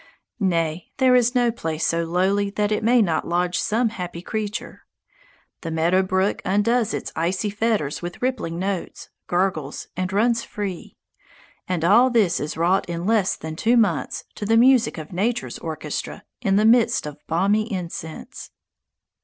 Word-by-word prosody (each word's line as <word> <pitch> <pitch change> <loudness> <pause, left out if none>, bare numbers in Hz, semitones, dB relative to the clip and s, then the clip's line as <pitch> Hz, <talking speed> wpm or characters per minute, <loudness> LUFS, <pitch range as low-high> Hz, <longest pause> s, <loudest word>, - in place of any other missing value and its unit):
Nay, 170 -4 -1
there 260 -2 +4
is 245 0 +3
no 245 -1 +3
place 160 -8 -3
so 165 0 +1
lowly 190 +4 +1
that 205 +1 -1
it 210 +1 0
may 235 +1 +5
not 165 -5 -1
lodge 175 +1 0
some 225 +2 +1
happy 180 -5 -6
creature. 210 0 -5 0.7
The 165 - -5
meadow 165 +3 +2
brook 190 +1 0
undoes 220 +4 +1
its - - -5
icy 185 +5 -1
fetters 210 -9 -1
with 175 0 -6
rippling 250 -10 -2
notes, 190 0 -4 0.2
gurgles, 175 -5 -1
and 185 +1 -2
runs 230 +4 +2
free. 200 -4 -6 0.7
And 175 -3 -1
all 235 +8 +6
this 215 -8 +2
is 150 +2 -4
wrought 175 +3 +1
in 170 0 -3
less 215 -3 +2
than 160 0 -7
two 235 +8 +2
months 200 -10 +1
to - - -8
the 225 +1 +4
music 245 -3 +4
of 155 +2 -8
nature's 225 +7 -1
orchestra, 155 -2 -5 0.2
in 195 -5 +2
the 210 +2 +3
midst 230 -5 +4
of 150 -1 -7
balmy 205 +7 +1
incense. 170 -4 -6
195 Hz, 160 wpm, -23 LUFS, 170-225 Hz, 0.7 s, all